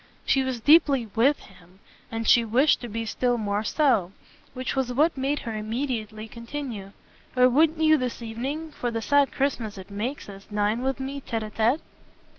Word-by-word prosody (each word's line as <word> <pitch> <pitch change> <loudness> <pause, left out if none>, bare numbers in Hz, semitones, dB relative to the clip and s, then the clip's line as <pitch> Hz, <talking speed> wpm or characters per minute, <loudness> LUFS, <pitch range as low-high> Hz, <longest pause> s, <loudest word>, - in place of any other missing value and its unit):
she 270 - +3
was 260 -2 -2
deeply 280 -3 +4
"with" 265 +6 +3
him, 180 -1 -18 0.3
and 225 0 -3
she 235 - +6
wished 250 +7 +3
to 240 - -5
be 225 +1 -4
still 245 +2 0
more 205 -1 -1
so: 220 - +2 0.4
which 255 0 -3
was 265 -2 0
what 300 +7 +2
made 275 +2 -1
her 225 - -5
immediately 220 -1 -3
continue. 235 -4 -7 0.4
"Or 250 0 +6
wouldn't 310 +5 +3
you 310 -1 +5
this 250 -2 -3
evening, 265 +8 -5
for 245 -4 -3
the 230 -1 -2
sad 285 +3 +3
Christmas 240 -7 -2
it 190 +1 -10
makes 230 +8 -4
us, 195 -1 -11
dine 210 +2 0
with 265 +1 -1
me 275 +1 -5
tete 225 -4 -3
a 215 - -7
tete?" 235 +8 +1
240 Hz, 185 wpm, -25 LUFS, 220-275 Hz, 0.4 s, she